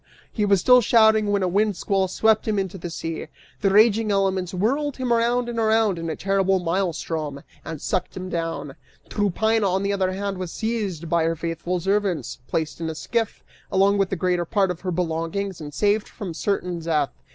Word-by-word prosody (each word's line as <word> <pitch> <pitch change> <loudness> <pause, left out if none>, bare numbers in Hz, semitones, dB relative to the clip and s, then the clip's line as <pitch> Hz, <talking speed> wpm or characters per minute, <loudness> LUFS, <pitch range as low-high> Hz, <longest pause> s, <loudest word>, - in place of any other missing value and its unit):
He 210 - 0
was 200 -1 +4
still 250 +6 +6
shouting 220 -1 +4
when 200 -1 +1
a - - +2
windsquall 195 0 +1
swept 220 +4 +2
him 215 -1 +1
into 190 -1 -3
the 175 - -5
sea; 165 -1 -5 0.3
the 200 - +3
raging 215 +1 +4
elements 190 -2 +1
whirled 270 +10 0
him 255 -2 0
around 240 +1 +1
and 235 -1 -3
around 220 -4 +2
in 165 0 -4
a 160 - -2
terrible 195 0 +1
maelstrom 165 -5 -2 0.2
and 160 -2 -6
sucked 180 - -2
him 185 0 -5
down. 165 -5 -3 0.4
Tryphaena, 215 +1 +1
on 190 +2 0
the 200 0 0
other 190 -2 0
hand, 195 0 -3
was 180 -3 -4
seized 205 -8 -3
by 165 0 +2
her 165 0 +1
faithful 170 +2 -3
servants, 190 - -1
placed 160 +1 -2
in 165 - -2
a 160 - -5
skiff, 225 +6 -2 0.3
along 200 +1 +3
with 195 -1 +2
the - - -1
greater 180 0 0
part 190 +2 +1
of 170 - -7
her 185 - -3
belongings, 175 +2 -2
and 150 -1 -7
saved 205 +6 +1
from 195 -7 -6
certain 180 -1 -2
death. 155 -4 0
190 Hz, 195 wpm, -23 LUFS, 170-210 Hz, 0.4 s, still